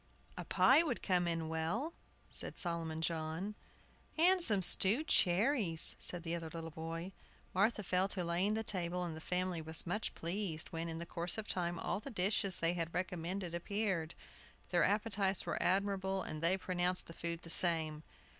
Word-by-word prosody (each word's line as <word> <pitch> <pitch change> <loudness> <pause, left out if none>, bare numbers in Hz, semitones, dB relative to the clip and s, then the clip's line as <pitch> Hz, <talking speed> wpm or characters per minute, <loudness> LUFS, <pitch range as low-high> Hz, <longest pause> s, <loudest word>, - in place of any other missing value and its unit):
"A - - -5
pie - - +5
would 305 -8 -2
come 180 -3 +1
in 165 -1 -2
well," 165 - -2 0.4
said - - -4
Solomon 165 -2 -1
John. 165 +5 -2 0.6
"And 365 +3 +6
some 210 - +6
stewed 205 - +6
cherries," 185 - +3
said 175 -1 +1
the 165 -1 -3
other 165 -1 -4
little 165 0 -7
boy. 165 +3 -6 0.4
Martha 210 +3 +2
fell 185 +1 +1
to 190 -2 -1
laying 180 +5 0
the 220 - -2
table, 180 -3 -1
and 170 -3 -4
the 160 - -8
family 180 -1 -2
was 160 0 0
much 205 +5 -2
pleased, 170 -2 -3
when, 165 0 -4
in 165 - -5
the 170 - -5
course 170 +3 -4
of 220 -1 -4
time, 175 -1 -2
all 185 - -2
the 245 - -8
dishes 195 -3 +1
they 165 +1 +1
had 170 -1 -3
recommended 180 0 -3
appeared. 185 -2 -2 0.5
Their - - +3
appetites 205 -2 +1
were - - -2
admirable, 195 0 0
and 155 - -5
they 170 +3 +3
pronounced 180 -1 -1
the 165 - -10
food 170 0 -5
the 165 - -5
same. 160 -3 +1
180 Hz, 175 wpm, -35 LUFS, 165-200 Hz, 0.6 s, And